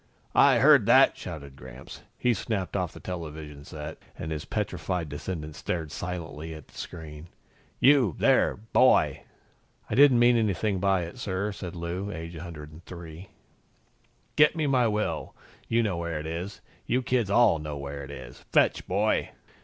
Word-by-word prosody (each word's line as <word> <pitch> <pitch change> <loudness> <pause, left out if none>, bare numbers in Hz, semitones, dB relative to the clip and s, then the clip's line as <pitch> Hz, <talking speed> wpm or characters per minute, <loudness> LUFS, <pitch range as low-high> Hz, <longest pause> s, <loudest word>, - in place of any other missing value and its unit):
"I - - +6
heard - - +6
that!" - - +6
shouted 70 -3 -8
Gramps. 65 0 -11 0.2
He 125 - +2
snapped 100 -3 -3
off 90 -4 -1
the - - -12
television 75 -5 -7
set 75 +1 -8 0.2
and 80 - -5
his 75 -1 -4
petrified 90 -5 -3
descendants 75 +1 -6
stared 80 -4 -3
silently 80 -2 -5
at 75 - -12
the - - -21
screen. 80 -2 -8 0.5
"You, 130 - +5
there, - - +3
boy 110 +3 +3 0.3
" - - -36
"I - - 0
didn't 140 -2 +7
mean 120 0 +5
anything 105 -2 0
by 95 -2 +2
it, 85 +8 -8
sir," 100 -1 -2
said 90 -3 -7
Lou, 85 +4 -4
aged 85 -1 -7
103. 85 +2 -10 1.1
"Get 150 +1 +6
me 160 -2 0
my 130 -4 +3
will. 95 -10 -2 0.3
You 115 +1 +2
know 100 -6 -1
where 85 -2 -3
it 75 - -7
is. 85 +5 -5 0.3
You 130 +2 +1
kids 120 -5 0
all 105 -5 +4
know 75 -1 -5
where 70 0 -6
it 70 - -9
is. 65 -4 -9
Fetch, - - +3
boy!" 105 +3 +1
85 Hz, 160 wpm, -27 LUFS, 75-105 Hz, 1.1 s, didn't